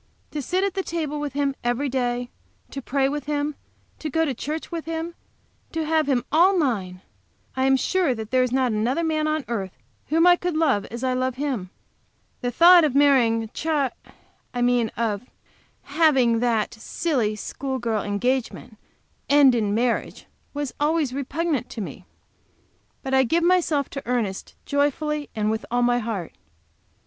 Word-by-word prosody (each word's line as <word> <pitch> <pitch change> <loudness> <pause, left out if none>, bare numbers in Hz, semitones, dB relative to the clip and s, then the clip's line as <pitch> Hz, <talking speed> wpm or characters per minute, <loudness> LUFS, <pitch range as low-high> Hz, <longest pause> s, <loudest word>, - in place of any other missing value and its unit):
To 300 - -3
sit 365 +8 0
at 395 -2 0
the 385 - -1
table 310 -5 -3
with 295 -2 -4
him 280 -1 0
every 245 +4 0
day, 245 -2 -2 0.4
to 275 - -5
pray 270 +1 +1
with 290 -1 -3
him, 295 0 -1 0.5
to 310 - -4
go 325 +3 +1
to 280 - -1
church 305 +8 -5
with 335 -2 -4
him, 325 +1 -4 0.6
to 325 -1 -1
have 315 -2 +1
him 250 -2 +1
all 360 +5 +5
mine! 195 - -1 0.5
I 260 0 +1
am 270 0 +4
sure 350 -2 +1
that 220 -1 -7
there 255 0 +3
is 255 -1 0
not 260 -1 +2
another 235 +9 0
man 310 -1 0
on 310 -2 -1
earth 195 - -4 0.3
whom 325 +3 +3
I 355 0 +7
could 355 -3 -2
love 270 -11 +2
as 235 +2 -7
I 255 -1 +1
love 255 0 -1
him. 260 -9 -3 0.7
The 245 - -1
thought 345 +7 +7
of 290 -4 +1
marrying 240 -6 +4
Ch, 315 - -7
I 290 -5 +1 0.7
mean 245 -2 +2
of 215 -3 -1 0.6
having 280 -6 +3
that 230 -3 0
silly, 225 -1 -1
school 265 +5 -4
girl 225 -4 -1
engagement 230 +2 -2 0.5
end 280 -2 +6
in 215 -4 0
marriage, 235 +1 -1 0.3
was 290 -2 -4
always 295 -3 +1
repugnant 280 0 -2
to - - -7
me. 200 - -7 1.0
But 265 - -3
I 265 - +6
give 330 +8 +1
myself 335 -6 +2
to 275 -2 -7
Ernest 225 -6 -2
joyfully 290 +1 0
and 215 0 0
with 220 0 -2
all 245 +1 +1
my 245 0 +3
heart. 215 -7 -4
270 Hz, 170 wpm, -24 LUFS, 240-310 Hz, 1.0 s, I